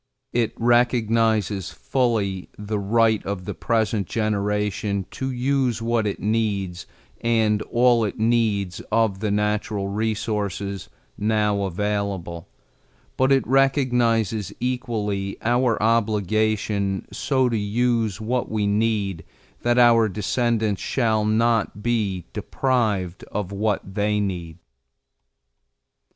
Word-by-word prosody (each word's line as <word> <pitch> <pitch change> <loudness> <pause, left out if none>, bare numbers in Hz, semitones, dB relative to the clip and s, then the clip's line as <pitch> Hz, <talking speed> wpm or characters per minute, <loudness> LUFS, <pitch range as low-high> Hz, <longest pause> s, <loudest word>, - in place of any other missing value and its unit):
It 115 -2 +1
recognizes 115 -4 +2
fully 110 -8 -1
the 105 0 -3
right 110 +2 +2
of 95 -2 -4
the - - -4
present 110 -4 0
generation 105 -2 -1
to 130 - -4
use 130 -2 0
what 115 -1 0
it 100 - -3
needs 100 -5 -1 0.4
and 110 -2 +2
all 120 +1 +3
it 105 - -3
needs 110 -5 +1
of 110 -3 +2
the 105 0 -1
natural 105 -1 -1
resources 105 -2 -2 0.3
now 105 -1 +1
available, 95 -3 -3 0.7
but 130 +1 +2
it 135 -1 +3
recognizes 120 - +2
equally 105 -6 -2
our 120 0 +2
obligation 110 -2 +1
so 130 -2 +1
to 120 - -1
use 110 -1 0
what 120 +3 -1
we 105 -2 0
need 100 -4 0 0.4
that 120 0 +2
our 115 -2 +6
descendants 110 +1 0
shall 110 -4 +1
not 110 -1 +1
be 105 -7 -1
deprived 105 -9 -1
of 100 -2 -4
what 100 -1 -2
they 105 +1 +1
need. 90 -5 -3
110 Hz, 110 wpm, -23 LUFS, 100-115 Hz, 0.7 s, our